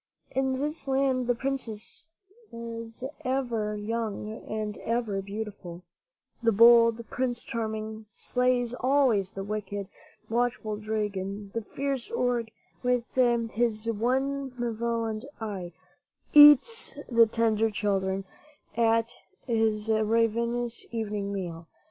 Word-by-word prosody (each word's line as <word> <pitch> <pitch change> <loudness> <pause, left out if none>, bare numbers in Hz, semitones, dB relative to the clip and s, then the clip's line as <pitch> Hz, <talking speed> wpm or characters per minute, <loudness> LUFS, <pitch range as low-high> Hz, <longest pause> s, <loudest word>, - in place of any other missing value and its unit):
In 265 0 0
this 295 0 -3
land 265 -2 +1
the 245 - +2
princess 265 +3 -3 0.4
is 230 0 -7 0.2
ever 240 -5 -1
young 215 0 -4
and 215 -1 -3
ever 225 -4 -1
beautiful; 195 -4 -7 0.6
the 230 -1 +3
bold 230 +1 +6
Prince 245 -2 -1
Charming 220 -1 -4
slays 250 -1 0
always 250 -7 +2
the 195 - -5
wicked, 205 -1 -4 0.4
watchful 230 -2 -1
dragon; 205 -2 -3
the 230 - -1
fierce 275 - -3
Ogre, 245 - 0 0.3
with 250 -1 +1
his 230 -2 +1
one 265 +4 -1
malevolent 230 -1 -2
eye 195 -6 -5
forever - - -37 0.5
eats 295 - +7
the 230 -2 +5
tender 225 -1 +2
children 195 -2 -1 0.5
at 230 0 +2 0.3
his 225 -2 +1
ravenous 230 +2 +1
evening 210 -3 -3
meal. 170 -4 -5
230 Hz, 105 wpm, -28 LUFS, 210-245 Hz, 0.6 s, eats